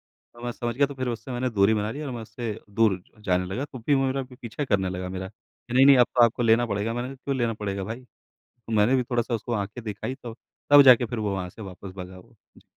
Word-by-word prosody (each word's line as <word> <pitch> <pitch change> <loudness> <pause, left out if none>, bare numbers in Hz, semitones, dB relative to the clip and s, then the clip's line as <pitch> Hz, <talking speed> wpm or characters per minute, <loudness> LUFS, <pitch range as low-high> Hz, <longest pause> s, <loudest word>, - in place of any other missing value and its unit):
तो 120 0 -18
मैं 120 - -2
समझ 120 -1 -4
गया 140 +1 +3
तो 140 - -8
फिर 130 -1 -3
उससे 120 +2 -3
दूरी 100 -1 +3
बना 105 +1 -1
ली 145 - -6
और 140 -4 -4
मैं 120 -2 -5
उससे 110 0 -5 0.2
दूर 100 -3 +2 0.2
जाने 90 -3 0
लगा। 120 +10 -3
तो 130 -4 -10
फिर 140 +5 +2
वो 135 0 +2
मेरा 135 0 -1
पी 125 0 -14
पीछा 115 +5 -4
करने 95 -5 +1
लगा 90 0 -4
मेरा 95 0 -5
कि 120 +2 -15
नहीं, 130 +2 +6
नहीं 140 -2 +8
अब 120 - +6
तो 120 - +7
आपको 120 +1 -1
लेना 115 +1 +4
पड़ेगा, 105 +1 -2
मैंने 120 +1 -3
कहा 135 - -8
क्यों 140 -1 0
लेना 115 -2 0
पड़ेगा 100 -2 -4
भाई? 115 +5 -6 0.3
तो 115 -2 -13
मैंने 110 +4 +4
भी 125 - +2
थोड़ा-सा 120 -1 -1
उसको 115 +2 -4
आँखें 105 +2 -3
दिखाई 105 +5 -4
तो 120 -3 -9 0.4
तब 145 0 +10
जाके 125 -2 +7
फिर 120 0 -5
वो 105 -2 -1
वहाँ 90 -2 -3
से 110 - -11
वापस 95 0 -9
भगा 95 0 -8
वो। 90 - -18 0.2
जी। - - -21
115 Hz, 270 wpm, -25 LUFS, 100-125 Hz, 0.4 s, तब